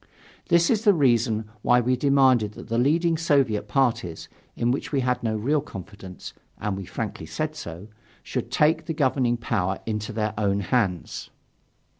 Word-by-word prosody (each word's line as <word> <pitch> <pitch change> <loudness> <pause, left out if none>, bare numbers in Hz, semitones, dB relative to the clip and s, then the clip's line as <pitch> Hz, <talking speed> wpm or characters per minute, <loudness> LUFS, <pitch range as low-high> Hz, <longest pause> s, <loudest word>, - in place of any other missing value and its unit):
This 170 -1 +4
is 220 -2 +1
the 205 -4 +5
reason 115 -6 +2 0.2
why 120 +2 +4
we 125 +1 +1
demanded 130 -5 +3
that - - -11
the 115 +1 +1
leading 165 +5 +2
Soviet 140 -10 +2
parties, 115 - 0 0.3
in 120 +1 +1
which 130 - -3
we 140 -3 +1
had 125 0 0
no 110 -2 -1
real 140 +7 +1
confidence 95 - -10 0.2
(and 105 -2 -2
we 95 -1 -6
frankly 100 -5 -5
said 155 - -3
so), 90 - -8 0.4
should - - -4
take 155 +1 +2
the 160 - -2
governing 130 -4 +1
power 100 -6 -1
into 105 -1 -3
their 105 -1 -2
own 100 -1 +1
hands. 95 -5 -1
120 Hz, 165 wpm, -25 LUFS, 105-145 Hz, 0.4 s, the